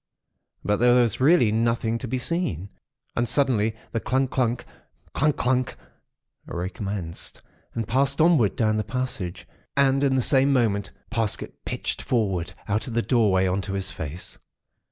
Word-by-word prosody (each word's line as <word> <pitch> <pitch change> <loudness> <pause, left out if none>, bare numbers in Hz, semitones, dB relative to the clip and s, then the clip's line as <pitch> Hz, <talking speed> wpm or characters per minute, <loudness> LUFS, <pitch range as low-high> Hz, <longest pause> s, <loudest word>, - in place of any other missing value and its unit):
But, 105 0 +1
there 120 +1 +5
was 120 -1 +1
really 135 -6 +5
nothing 115 0 0
to 130 - -5
be 130 +3 -1
seen. 120 - -2 0.5
And 120 0 0
suddenly 115 -6 +2 0.2
the 115 - -1
clungk, 130 +3 0
clunck—clungk, 130 +4 -2
clunck, 130 - 0 0.7
recommenced, 90 -1 -4 0.3
and 115 -2 -2
passed 135 +3 +1
onward 155 - +4
down 110 -2 +1
the 110 - 0
passage. 110 -6 -4 0.3
And 135 0 +3
in 135 -1 +3
the 130 - +2
same 135 +1 +4
moment, 110 -7 +1 0.2
Parsket 115 -3 -1
pitched - - -3
forward 95 -8 -1
out 105 +4 -1
of 115 - -5
the 115 - +2
doorway 105 -7 +3
on 95 +1 0
to 95 +1 -5
his 95 0 0
face. 80 +4 -7
115 Hz, 150 wpm, -25 LUFS, 100-130 Hz, 0.7 s, there